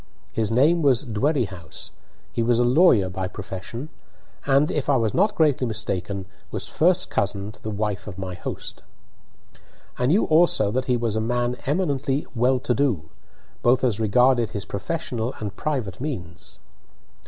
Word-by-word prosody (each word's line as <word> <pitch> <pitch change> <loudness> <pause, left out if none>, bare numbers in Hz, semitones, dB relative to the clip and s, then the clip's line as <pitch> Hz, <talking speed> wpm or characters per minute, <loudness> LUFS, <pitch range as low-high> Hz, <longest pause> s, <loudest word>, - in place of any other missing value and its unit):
His 110 -2 0
name 145 +9 +4
was 140 -3 +3
Dwerrihouse, 110 - -2 0.4
he - - 0
was 115 0 +3
a 120 - +3
lawyer 125 - +5
by 95 0 -3
profession, 100 +8 -7 0.6
and, 140 +2 +4
if 145 -2 -2
I 140 - +5
was 115 -4 +1
not 205 +4 +2
greatly 145 -7 +2
mistaken, 100 -3 -2 0.2
was - - -5
first 180 +3 +2
cousin 100 +1 -1
to 105 - -15
the 110 - -5
wife 105 -1 -3
of 95 -3 -7
my 95 -1 -5
host. 90 - -6 1.2
I 125 - +2
knew 185 - +3
also 155 -10 +4
that 130 +3 -1
he 125 -1 +2
was 115 -2 -1
a 110 - +1
man 120 +2 0
eminently 140 -3 0
"well 125 +2 +3
to 125 - 0
do," 115 - 0 0.5
both 125 +2 +3
as 115 -5 +1
regarded 120 +2 +3
his 100 -2 -4
professional 120 - -3
and 105 -2 -5
private 125 -10 -3
means. 90 - -6
120 Hz, 160 wpm, -24 LUFS, 100-140 Hz, 1.2 s, lawyer